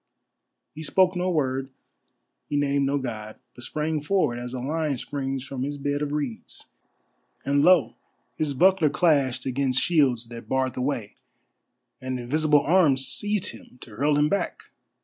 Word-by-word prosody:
He 155 - -8
spoke 185 +3 +2
no 180 +1 0
word, 135 -5 -1 0.8
he 145 - 0
named 140 -1 +1
no 140 +1 +1
God, 110 -5 -5 0.2
but 125 - -12
sprang 155 +3 -2
forward 150 -7 +1
as 120 0 -6
a - - -3
lion 150 +1 -1
springs 135 0 -4
from 135 -2 -6
his 145 +2 -3
bed 145 +1 -2
of 145 -1 -2
reeds; 145 -6 -5 0.7
and, 140 +1 +2
lo! 180 -5 +5 0.4
his 145 -3 -2
buckler 185 +1 +4
clashed 140 -6 +2
against 130 -1 +1
shields 130 -9 +2
that 120 0 -10
barred 130 -1 0
the 125 - -4
way, 125 -6 -3 0.8
and 130 -1 -3
invisible 150 +4 +2
arms 145 -6 +3
seized 205 +3 0
him 125 - -15
to 115 - -11
hurl 145 +5 +2
him 150 0 +4
back. 200 +5 -2
140 Hz, 160 wpm, -25 LUFS, 130-155 Hz, 0.8 s, lo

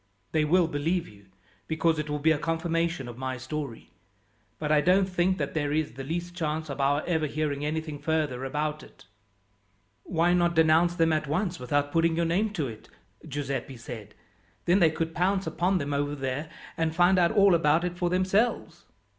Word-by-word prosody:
"They 155 -1 +2
will 170 +2 +3
believe 165 +3 -1
you, 100 -1 -17 0.4
because 160 0 +1
it 150 0 -3
will 150 - -1
be 155 +2 +3
a 155 - +1
confirmation 165 -2 -1
of 120 0 -9
my 130 -1 -3
story; 130 - -6 0.7
but 150 -1 -2
I 150 -1 +5
don't 185 +4 +4
think 185 0 +1
that 140 -3 -3
there 145 -2 -1
is 155 -2 0
the 135 +2 -7
least 175 +5 -4
chance 155 -3 -3
of 140 - -4
our 145 +2 +2
ever 160 -3 0
hearing 145 -1 -2
anything 155 -1 -3
further 150 -4 -1
about 150 +3 -2
it." - - -17 1.0
"Why 170 - +1
not 175 -1 +2
denounce 160 +2 +4
them 165 -1 +3
at 155 -1 -1
once 175 +4 -1
without 145 +3 0
putting 165 0 +2
your 170 0 +1
name 190 +7 +1
to 155 -9 -1
it," 110 -2 -10 0.4
Giuseppi 135 -3 -4
said. 110 -3 -9 0.5
"Then 180 +3 +4
they 165 -4 +5
could 165 +1 -3
pounce 190 +3 +1
upon 185 +2 +1
them 145 -3 -2
over 145 +1 -1
there, 135 +2 -3 0.3
and 160 -1 0
find 180 +2 +4
out 170 -1 +4
all 200 -3 +5
about 160 0 +3
it 180 0 -2
for 175 0 0
themselves?" 190 +6 0
160 Hz, 190 wpm, -27 LUFS, 145-175 Hz, 1.0 s, I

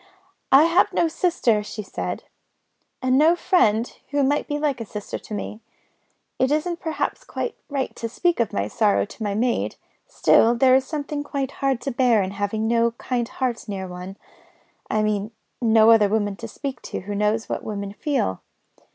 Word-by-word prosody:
"I 275 +3 +8
have 335 +2 +3
no 340 - +2
sister," 315 - +1
she 210 +1 -6
said, 195 - -5 0.8
"and 255 +1 +3
no 320 +3 +5
friend 230 - +3 0.2
who 285 0 +1
might 285 +2 +1
be 295 - -1
like 290 -5 -1
a - - -4
sister 210 -1 -6
to - - -10
me. 210 +2 -6 0.8
It 260 +2 +2
isn't 335 +3 0
perhaps 320 -1 -3
quite 470 - -4 0.2
right 275 -2 -2
to 230 - -4
speak 345 +7 0
of 230 -6 +1
my 100 +1 -1
sorrow 210 - +2
to 210 - -14
my 205 -2 -1
maid. 240 +3 0 0.3
Still, 235 +2 +4
there 255 +2 +5
is 265 0 +3
something 295 -1 -3
hard 275 -2 -2
to 275 - -3
bear 240 -4 +3
in 185 - -4
having 205 +2 -2
no 230 0 +2
kind 240 0 -2
heart 250 -3 -3
near 195 -2 -4
one 180 +2 -8 0.7
I 215 0 +1
mean, 210 -1 0 0.3
no 225 -1 +6
other 215 -3 +5
woman 205 -1 0
to 230 - -7
speak 270 +4 -6
to - - -4
who 205 +2 -5
knows 210 +2 0
what - - -3
women 200 -2 -5
feel. 250 - -1
235 Hz, 180 wpm, -23 LUFS, 210-280 Hz, 0.8 s, I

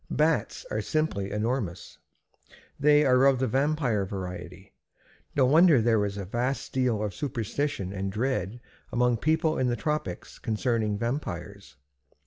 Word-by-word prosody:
Bats - - 0
are - - -1
simply 155 -12 -1
enormous. 105 -5 -3 0.8
They 150 +1 +5
are 130 0 +5
of 135 -1 +4
the 130 - 0
vampire 135 -4 +1
variety. 95 -2 -7 0.6
No 135 - +4
wonder 155 +1 +6
there 110 -2 +3
is 100 0 -4
a 100 - -4
vast 125 +7 -2
deal 125 -5 +1
of 105 -2 -3
superstition 120 -4 -3
and 95 0 -3
dread 115 -1 -2 0.3
among 125 -1 +2
people 160 +4 +1
in 130 - +2
the 120 - +1
tropics 150 - -4
concerning 110 -2 0
vampires. 100 - -5
120 Hz, 135 wpm, -27 LUFS, 100-140 Hz, 0.8 s, wonder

